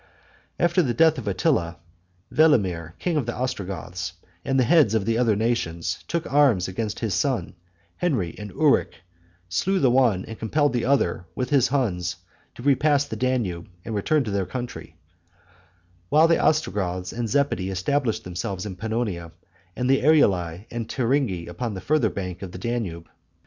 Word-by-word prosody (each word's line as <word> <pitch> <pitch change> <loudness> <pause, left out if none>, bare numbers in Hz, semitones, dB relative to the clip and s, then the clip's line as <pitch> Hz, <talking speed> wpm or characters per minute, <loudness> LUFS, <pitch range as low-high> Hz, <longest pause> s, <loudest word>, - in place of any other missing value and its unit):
After 175 +1 +3
the 125 -7 -1
death 160 -3 +4
of 110 - -8
Attila, 85 -3 0 0.6
Velamir, 95 - +2
king 170 -3 -1
of 135 -6 -1
the 120 - -2
Ostrogoths, 95 -7 -4 0.3
and 135 0 +1
the - - +5
heads 145 - +4
of 105 -3 +1
the 115 0 +1
other 115 -4 +3
nations, 105 -7 -1
took 170 -1 -2
arms 130 -11 +4
against 105 +3 -4
his 110 -4 -1
sons 95 -1 0 0.4
Henry 125 - 0
and 105 0 -6
Uric, - - +2 0.5
slew 135 - 0
the 135 -9 +3
one 120 -8 +3
and 110 - -9
compelled 145 +6 +1
the 120 -2 0
other, 120 -10 +1
with 125 +1 -3
his 140 -4 +4
Huns, 95 -11 -1 0.4
to 120 - -10
repass 145 +1 +3
the 110 - -6
Danube 110 -8 -1 0.2
and 115 - -4
return 140 +9 +1
to 110 - -4
their 100 -2 -1
country; 120 +5 -6 1.1
while 155 +7 +5
the 165 - +3
Ostrogoths 95 - 0
and 120 0 -2
the - - -7
Zepidi 140 -10 +1
established 115 +6 -1
themselves 90 +2 -4
in 95 -3 -6
Pannonia, 105 -6 -3 0.4
and 125 - -1
the 135 +1 +3
Eruli 95 - +3
and 115 -1 -4
the - - -4
Turingi 125 -9 0
upon 105 +5 -4
the - - -5
farther 155 +10 +2
bank 90 -2 -5
of 95 -2 -6
the - - -6
Danube. 95 -7 -3
115 Hz, 170 wpm, -24 LUFS, 90-135 Hz, 1.1 s, the